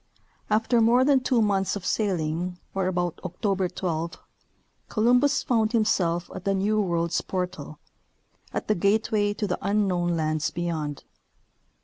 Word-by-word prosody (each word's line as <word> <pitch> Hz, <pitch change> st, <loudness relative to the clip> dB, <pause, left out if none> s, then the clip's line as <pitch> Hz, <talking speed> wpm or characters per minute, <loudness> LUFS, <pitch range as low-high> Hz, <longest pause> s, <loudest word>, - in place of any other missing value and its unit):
After 225 Hz, +2 st, +2 dB
more 240 Hz, +3 st, +4 dB
than 280 Hz, -1 st, +5 dB
two 255 Hz, -3 st, +2 dB
months 195 Hz, -2 st, +1 dB
of 195 Hz, -3 st, -6 dB
sailing, 180 Hz, -3 st, -1 dB, 0.2 s
or 190 Hz, -1 st, 0 dB
about 175 Hz, -2 st, -1 dB
October 185 Hz, +1 st, -1 dB
12, 170 Hz, -2 st, -3 dB, 0.7 s
Columbus 245 Hz, +6 st, +3 dB
found 225 Hz, -2 st, +1 dB
himself 180 Hz, -6 st, +1 dB
at -, -, -7 dB
the 195 Hz, 0 st, +1 dB
New 210 Hz, +3 st, +1 dB
World's 170 Hz, -3 st, 0 dB
portal 180 Hz, -1 st, -4 dB, 0.4 s
— -, -, -35 dB
at -, -, -4 dB
the 215 Hz, -, +3 dB
gateway 205 Hz, +2 st, +1 dB
to 210 Hz, -, -2 dB
the 195 Hz, -, -2 dB
unknown 180 Hz, -4 st, +1 dB
lands 155 Hz, -1 st, 0 dB
beyond. 160 Hz, -4 st, -3 dB
195 Hz, 140 wpm, -26 LUFS, 175-215 Hz, 0.7 s, than